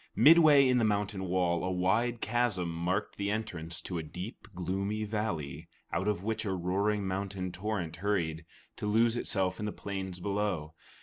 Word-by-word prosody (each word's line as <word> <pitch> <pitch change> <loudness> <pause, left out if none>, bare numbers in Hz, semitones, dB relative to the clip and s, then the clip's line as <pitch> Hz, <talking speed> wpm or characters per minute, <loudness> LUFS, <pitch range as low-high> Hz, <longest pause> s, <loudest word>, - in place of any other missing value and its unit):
Midway 150 -3 +7
in 125 -1 +4
the - - +2
mountain 100 -2 0
wall, 90 -2 +1
a 90 - 0
wide 110 +7 +1
chasm 110 -8 0
marked 85 +3 -1
the 100 0 -1
entrance 90 -7 -3
to 90 -3 -4
a - - -2
deep, 90 +8 -8
gloomy 95 +4 -2
valley, 85 -8 -3 0.3
out 95 - 0
of 105 -3 0
which 110 +1 -1
a 100 -3 -1
roaring 100 +3 0
mountain 95 -1 -3
torrent 90 -4 -3
hurried, 85 -4 -1 0.3
to 105 - -3
lose 115 +2 +3
itself 95 -5 0
in 105 - -2
the - - -2
plain 95 -2 -4
below. 100 -5 -1
100 Hz, 170 wpm, -31 LUFS, 90-105 Hz, 0.3 s, Midway